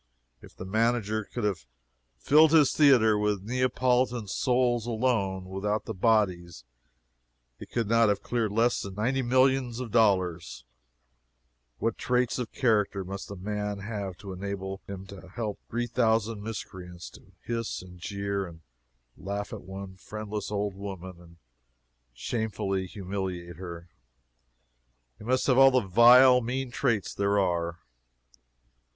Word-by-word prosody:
If - - -15
the 95 - -8
manager 110 +1 0
could 120 - -6
have 95 -11 -2 0.5
filled 155 - +5
his 150 -4 +5
theatre 120 -8 +5
with 105 -2 0
Neapolitan 125 -1 +1
souls 120 +1 +1
alone, 110 -6 0
without 100 +3 -2
the 110 - -4
bodies, 90 - +1 1.0
he - - -9
could 115 -3 -2
not 115 0 +4
have 100 -1 0
cleared 115 -4 -1
less 115 +3 +2
than 100 -1 -7
ninety 125 +6 0
millions 130 -1 +2
of 125 -4 -5
dollars. 95 - +1 1.1
What 115 - -2
traits 125 0 0
of 120 -3 -4
character 105 -5 +1
must 100 +2 -7
a 100 - -6
man 105 +1 -3
have 100 -3 -5
to 100 -2 -8
enable 95 0 -5
him 95 -1 -7
to 95 -1 -12
help 105 +1 -4
three 120 +1 -1
thousand 115 -2 +1
miscreants 95 -5 -7
to 95 - -18
hiss, 115 -4 -3
and 90 -1 -13
jeer, 100 +1 -3
and 80 -1 -13 0.5
laugh 100 +1 -5
at - - -6
one 95 0 -9
friendless 105 +1 -6
old 105 -1 -2
woman, 95 -2 -8
and 85 -1 -17 0.7
shamefully 95 - -2
humiliate 95 -3 -5
her? 85 -2 -8 1.3
He - - -11
must 130 +2 +1
have 130 -1 +4
all 135 0 +9
the 130 -1 +3
vile, 125 +5 +7
mean 125 +2 -3
traits 120 -6 0
there 100 0 +1
are. 85 -3 0
105 Hz, 140 wpm, -28 LUFS, 95-120 Hz, 1.3 s, all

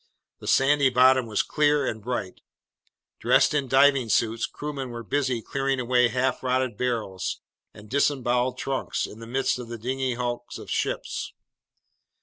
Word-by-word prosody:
The - - -10
sandy 140 0 +4
bottom 130 0 +4
was 105 -2 0
clear 150 -2 +2
and 110 -3 -3
bright. 105 -5 -4 0.8
Dressed - - +3
in 140 -3 0
diving 135 -2 +4
suits, 115 +2 +1
crewmen 140 -3 -6
were 120 -1 -7
busy 125 +1 -1
clearing 135 -1 -1
away 125 0 +3
half 125 +3 -1
rotted 130 -2 0
barrels 110 -6 -2 0.3
and 105 0 -14
disemboweled 125 -1 +1
trunks 135 0 -2
in 105 - -11
the 115 - -9
midst 130 +1 0
of 125 - -7
the 120 0 -6
dingy 130 +2 -2
hulks 120 0 -4
of - - -9
ships. - - -2
125 Hz, 150 wpm, -25 LUFS, 115-135 Hz, 0.8 s, sandy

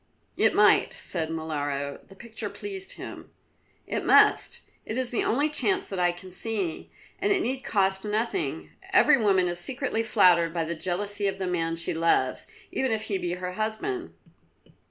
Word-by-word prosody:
"It - - +2
might," - - +4
said 160 -3 -3
Molara. 145 -3 -3
The 195 - -15
picture 220 0 -4
pleased 385 - -6
him. - - -9 0.6
"It - - -3
must. - - +5 0.2
It 220 - -5
is 260 -2 0
the 240 - 0
only 285 +6 +2
chance 385 +6 +1
that 195 - -4
I 175 0 +3
can 185 +1 -12
see, 195 -4 -4 0.3
and 400 +2 +1
it 380 -2 +2
need 260 +2 -2
cost 195 -6 0
you 210 - -4
nothing. 155 - -2 0.2
Every 285 -4 +5
woman 190 -4 +3
is 175 0 -2
secretly 250 +2 -1
flattered 180 -7 +3
by 165 -1 0
the 170 - -3
jealousy 200 +4 0
of 195 0 -2
the 190 - -3
man 165 -2 -1
she 165 - 0
loves, 165 -6 +1 0.2
even 265 -2 -1
if 220 -1 -1
he 200 -3 -2
be 175 -1 -2
her 180 0 -4
husband." 220 - -3
195 Hz, 175 wpm, -26 LUFS, 170-230 Hz, 0.6 s, must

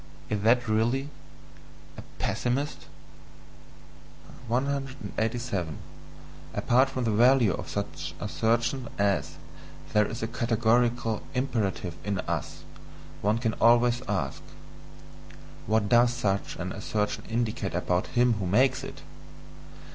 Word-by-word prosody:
Is 105 -1 -1
that 120 +3 +3
really 120 +6 +1 0.9
a - - -8 0.2
pessimist? 135 +5 -2 1.6
187. 120 - -2 0.8
Apart 130 +3 +3
from 130 -1 -3
the 115 - +1
value 120 -1 +5
of - - -6
such 100 0 -4
assertions 120 +3 0
as 100 -1 +1 0.6
"there 105 -1 +4
is 115 +1 -5
a - - 0
categorical 115 -1 +1
imperative 110 -9 -1
in 100 -1 -1
us," - - -4 0.6
one 105 +2 +2
can 115 -2 0
always 120 +1 +5
ask: 80 -10 -2 1.3
What 110 0 +2
does 120 +2 +5
such 100 -6 -1
an - - -4
assertion 105 -1 -2
indicate 115 -4 -1
about 90 0 0
him 120 0 +5
who 95 - -2
makes 125 +9 +3
it? - - -8
115 Hz, 110 wpm, -27 LUFS, 105-125 Hz, 1.6 s, value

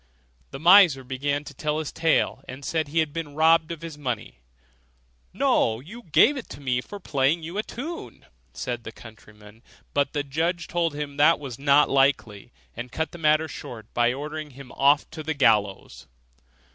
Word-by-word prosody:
The - - -8
miser 170 -5 +6
began 140 +3 -2
to 145 - -10
tell 150 +2 -2
his 155 -2 -4
tale, 160 -4 +1
and 130 +2 -9
said 160 -2 -1
he 150 +3 -5
had 155 -3 +1
been 160 -3 -5
robbed 160 +1 +4
of 165 -1 -7
his 160 -3 -8
money. 120 - -4 0.9
'No, 110 - +1
you 200 - -11
gave 240 - +4
it 255 - -8
me 130 -3 -1
for 205 +9 -10
playing 150 -1 0
a 190 +5 -2
tune - - -24
to 240 - -7
you.' 335 +4 -7 0.3
said 120 -2 -5
the 110 - -7
countryman; 105 -1 -15 0.3
but 140 -1 0
the 145 - -1
judge 165 +5 -2
told 170 -3 -1
him 145 -1 -5
that 150 +3 +5
was 135 -4 -8
not 140 +1 +4
likely, 135 -6 +1 0.2
and 120 +1 -7
cut 160 +4 -3
the 175 - -10
matter 155 0 +3
short 115 -6 -10
by 120 0 +3
ordering 150 +3 -6
him 135 -3 -11
off 140 +2 +3
to 160 -1 -7
the 155 0 -3
gallows. 105 -7 +1
145 Hz, 185 wpm, -25 LUFS, 130-160 Hz, 0.9 s, miser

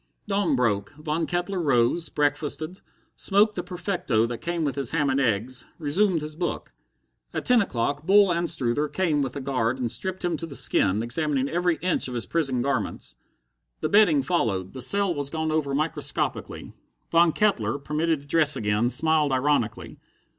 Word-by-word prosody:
Dawn 195 -7 +1
broke. 105 -5 0
Von 155 +1 -2
Kettler 175 +1 -2
rose, 135 +3 +1
breakfasted, 150 +4 -1 0.4
smoked 210 +2 +3
the 180 - -3
perfecto 175 - -1
that 115 0 -5
came 170 -1 -2
with 140 -3 -1
his 135 -3 -1
ham 150 -4 +1
and 135 - +1
eggs, 120 +1 0
resumed 170 +3 +1
his 150 0 -5
book. 175 +1 -4 0.6
At - - -3
ten 250 -2 +5
o'clock 145 - -2
Bull 195 +1 +5
Anstruther 150 -5 0
came 150 0 0
with 135 -1 -3
a - - -3
guard 130 -2 -1
and 120 -3 -2
stripped 185 +10 -4
him 170 -2 0
to 165 - -6
the 140 - -6
skin, 105 -3 +1
examining 135 +2 0
every 175 +2 +1
inch 180 -6 0
of 125 - -6
his 120 - -1
prison 135 -7 0
garments. 140 - -2 0.7
The - - -1
bedding 190 -9 +4
followed; 100 - -1
the 130 - -6
cell 200 +4 +3
was 145 -3 -1
gone 160 +1 -2
over 145 -3 0
microscopically. 155 +3 -2 0.4
Von 170 0 +5
Kettler, 145 - +1
permitted 150 +2 -1
to - - -17
dress 150 0 +2
again, 105 +3 0
smiled 155 0 +2
ironically. 130 -4 -1
150 Hz, 170 wpm, -25 LUFS, 130-170 Hz, 0.7 s, ten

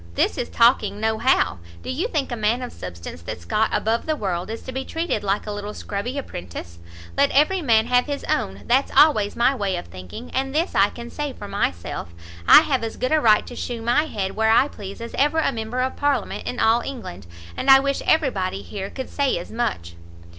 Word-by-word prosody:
this - - +2
is 240 - -3
talking 215 -4 +3
no 220 0 0
how. 260 - +2 0.2
Do - - -4
you 315 - -1
think 300 - -2
a - - -1
man 225 +3 0
of 250 - -6
substance, 85 -2 -8
that's 85 0 -7
got 220 - +1
above 225 +5 0
the 310 - +1
world, 185 -7 -3
is 225 +1 -6
to - - -6
be 265 +1 -3
treated 325 -10 -2
like 200 +1 0
a 210 - -4
little 205 0 -5
scrubby 230 +7 -4
apprentice? 85 - -7 0.4
Let 280 0 +4
every 305 +7 +3
man 225 -6 +3
have 245 +2 +2
his 285 -1 -3
own, 95 +1 -2
that's 260 +3 +2
always 215 -10 +5
my 245 +3 +3
way 200 -7 -1
of - - -5
thinking; 90 - -10
and 270 +1 -2
this 335 +4 0
I 195 +1 +4
can 235 0 -9
say 295 -2 -4
for 205 - -9
myself, 85 - -3 0.3
I - - +10
have 280 -6 0
as 225 - -4
good 255 - -1
a 310 -1 +4
right 215 -2 +5
to 245 - -9
shew 235 -2 -4
my 245 +7 +2
head 195 -10 -3
where 220 0 +2
I 240 +5 +5
please 200 -2 -9
as 235 - -7
ever 295 +3 +3
a 320 - +2
member 230 +1 -3
of 260 +1 -1
parliament 285 -6 -1
in 250 - -3
all 225 +2 +4
England; 160 - -7 0.3
and 270 - -2
I 270 0 +10
wish 275 0 -1
every 315 -4 +3
body 190 -1 -3
here 195 -1 -6
could 260 -1 -6
say 280 -2 0
as 170 - -7
much." 220 - -2
235 Hz, 225 wpm, -23 LUFS, 200-270 Hz, 0.4 s, I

